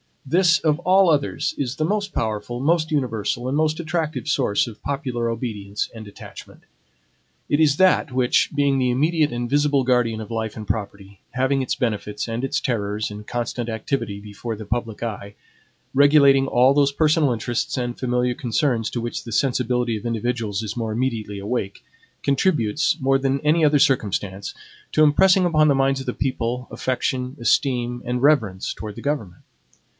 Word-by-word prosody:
This, 165 +2 +3
of 150 +1 +1
all 185 +1 +4
others, 145 -3 0
is 130 -3 -2
the 155 - -1
most 200 +2 -1
powerful, 110 +2 -3
most 160 +3 +1
universal, 120 -5 -1
and 135 +3 0
most 155 +1 +1
attractive 160 -2 -3
source 130 -9 +1
of 110 -3 -10
popular 130 -4 -2
obedience 105 -4 -4
and 110 -2 -9
attachment. 100 - -12 0.9
It 145 - +2
is 150 -2 +4
that 185 -5 +3
which, 125 -1 +2
being 140 -2 +2
the 125 -1 +2
immediate 155 +4 +1
and 120 0 -3
visible 145 -1 +2
guardian 125 -3 +1
of 110 - -9
life 110 -1 -3
and 110 -2 -8
property, 100 -2 -5
having 130 +2 +1
its 130 - -1
benefits 105 -3 -3
and 115 +2 -3
its 135 - 0
terrors 105 -3 -2
in 105 +1 -9
constant 120 0 -3
activity 110 -2 -3
before 105 +3 -6
the 110 0 -9
public 115 0 -3
eye, 100 -3 -5 0.6
regulating 140 -1 +5
all 130 +1 +4
those 140 -1 +3
personal 155 -1 +2
interests 120 +2 -2
and 120 -1 -3
familiar 125 -1 0
concerns 120 -1 0
to 120 - -3
which 120 0 -4
the 115 - -9
sensibility 125 -1 0
of 105 - -10
individuals 115 -2 -2
is 110 - -5
more 115 -2 -2
immediately 110 -4 -2
awake, 100 -1 -4 0.4
contributes, 140 - +1
more 135 0 +2
than 135 0 0
any 155 +2 +3
other 145 -1 +4
circumstance, 100 -7 0 0.4
to 155 - +4
impressing 185 +5 +5
upon 155 -3 +3
the 140 - +4
minds 135 0 +1
of 135 - -6
the 125 - -2
people, 125 -1 -2
affection, 130 +1 -2
esteem, 120 -1 +1
and 125 +1 -2
reverence 110 -11 +2
towards 105 -2 -8
the - - -8
government. 135 -12 -3
125 Hz, 170 wpm, -22 LUFS, 115-145 Hz, 0.9 s, regulating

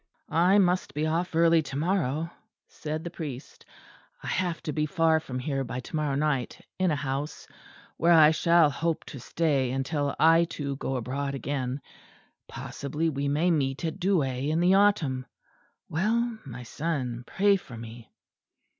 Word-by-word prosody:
"I 180 +5 +5
must 180 -7 +2
be 150 +1 0
off 165 +2 -1
early 165 0 +5
to 135 -2 -7
morrow," 160 -1 0 0.4
said 155 +1 -5
the 170 - -5
priest. 145 -7 -8 0.6
"I - - -9
have 175 -2 -1
to 150 - -3
be 150 -1 0
far 165 -1 +3
from 130 -5 -6
here 135 +1 -2
by 125 0 -5
to 140 - -8
morrow 150 -3 0
night, 140 -4 -1 0.2
in 185 -1 +3
a 155 - +1
house 140 +1 -4 0.5
where 170 +2 +3
I 155 -2 +8
shall 165 -1 +4
hope 165 +3 -2
to 135 - -7
stay 140 -1 0
until 140 +2 -1
I, 165 +2 +6
too, 145 -4 -4
go 135 -1 -3
abroad 135 +3 -3
again. 135 -1 -3 0.7
Possibly 150 +4 -3
we 140 0 -2
may 155 +5 +2
meet 140 -1 0
at 160 - -3
Douai 145 -8 +1
in 160 +2 +1
the 180 +2 +4
autumn. 165 -11 +2 0.6
Well, 225 +6 0
my 125 -2 -8
son, 125 -3 -3
pray 200 +1 +3
for 125 -11 -8
me." 115 0 -10
150 Hz, 165 wpm, -27 LUFS, 135-170 Hz, 0.7 s, I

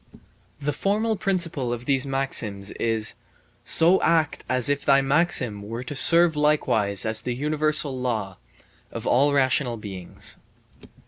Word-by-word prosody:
The 145 0 -2
formal 215 +7 0
principle 170 - -2
of 120 0 -5
these 135 0 +1
maxims 110 -7 -2
is: 110 -2 -1 0.5
"So 170 +3 +3
act 160 -3 +1
as 130 -2 0
if 145 0 -1
thy 140 -1 +4
maxim 135 -7 +2
were 115 +4 -6
to 135 +3 -6
serve 170 +3 +6
likewise 115 -10 +1
as 110 0 -2
the 125 - -4
universal 150 0 -1
law 110 -7 -3 0.5
(of - - -7
all 140 +4 +3
rational 130 -3 +1
beings)." 95 -4 -4
135 Hz, 135 wpm, -24 LUFS, 115-150 Hz, 0.5 s, serve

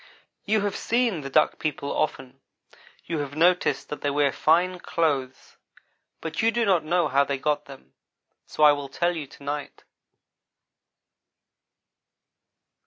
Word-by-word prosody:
"You 215 0 +2
have 205 -1 -2
seen 235 -8 0
the 135 - -6
Duck 155 +3 +2
people 145 -2 -3
often. 135 -3 -3 0.6
You 165 -2 -3
have 145 -1 -5
noticed 175 +3 +2
that 150 - -6
they 145 - 0
wear 145 -1 +2
fine 180 +5 +2
clothes 140 -7 -2 0.6
but 160 - -3
you 225 - +4
do 230 0 0
not 185 -6 +3
know 175 +2 +1
how 140 +2 +3
they 140 0 -2
got 145 +2 -1
them; 135 - -14 0.5
so 155 - -1
I 150 - +9
will 145 -1 -3
tell 175 +4 0
you 150 -4 -5
to 140 - -16
night. 145 0 -5
150 Hz, 145 wpm, -25 LUFS, 140-175 Hz, 0.6 s, I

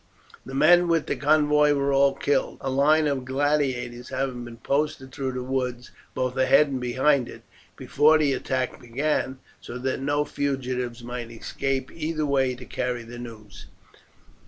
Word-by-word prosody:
The 135 - -7
men 175 +5 +5
with 165 -2 +2
the - - -1
convoy 150 +1 +3
were 140 -1 0
all 135 0 +4
killed, 140 0 0
a 135 - -2
line 150 +4 +4
of 140 -3 -1
gladiators 130 -3 -1
having 130 -2 -3
been 120 -1 -10
posted 140 +1 -2
through 135 -1 -3
the 125 0 -4
woods, 125 -1 -3 0.2
both 130 0 -1
ahead 140 +3 +5
and 130 -2 -3
behind 130 +1 +2
it, - - -11 0.3
before 155 +2 +3
the 145 -3 +2
attack 130 0 -2
began, 130 +2 -1 0.2
so 120 - -8
that 130 +1 -2
no 145 +1 0
fugitives 130 -4 -3
might 120 -1 -6
escape 130 +3 -3
either 155 -1 -2
way 135 -3 +1
to 125 0 -11
carry 125 -1 -3
the 120 +1 -10
news. 105 -6 -11
135 Hz, 160 wpm, -25 LUFS, 125-145 Hz, 0.3 s, men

